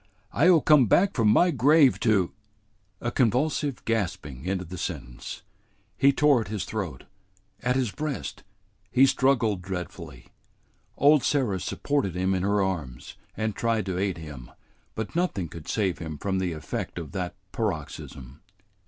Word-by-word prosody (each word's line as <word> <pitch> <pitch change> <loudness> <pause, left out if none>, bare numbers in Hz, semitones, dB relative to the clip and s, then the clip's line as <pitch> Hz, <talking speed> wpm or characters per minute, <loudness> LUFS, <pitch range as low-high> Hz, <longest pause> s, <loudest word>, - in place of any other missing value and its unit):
I'll 165 +3 +5
come 145 -6 +5
back 195 - +4
from 115 -3 +2
my 175 +12 +5
grave 140 +1 +5
to 100 -6 +2 0.4
" 100 -3 -42
A 120 - -2
convulsive 135 +3 0
gasping 90 - -2
ended 95 -3 -3
the 90 - -6
sentence. - - -6 0.5
He 140 - +5
tore 145 -3 +4
at 110 - -6
his 100 -2 -3
throat, 100 -7 -5 0.6
at 125 0 +1
his 130 -5 0
breast, 150 +1 -4 0.5
he 130 +4 +6
struggled 130 -7 +2
dreadfully. 90 -6 -7 0.7
Old 145 +1 +5
Sarah 125 -10 +1
supported 100 - -1
him 95 +1 +1
in 95 - 0
her 100 +1 +2
arms, 75 -11 -4 0.2
and 110 -2 -1
tried 115 -3 0
to 95 -2 -2
aid 95 -3 -1
him, 75 -6 -9 0.5
but 110 +5 -5
nothing 170 - 0
could 80 0 -11
save 100 -5 0
him 80 -3 -6
from 95 +4 -1
the 90 -2 -1
effect 75 +2 -5
of 80 -4 -6
that 90 -2 -4 0.2
paroxysm. 75 - -5
100 Hz, 155 wpm, -26 LUFS, 90-130 Hz, 0.7 s, he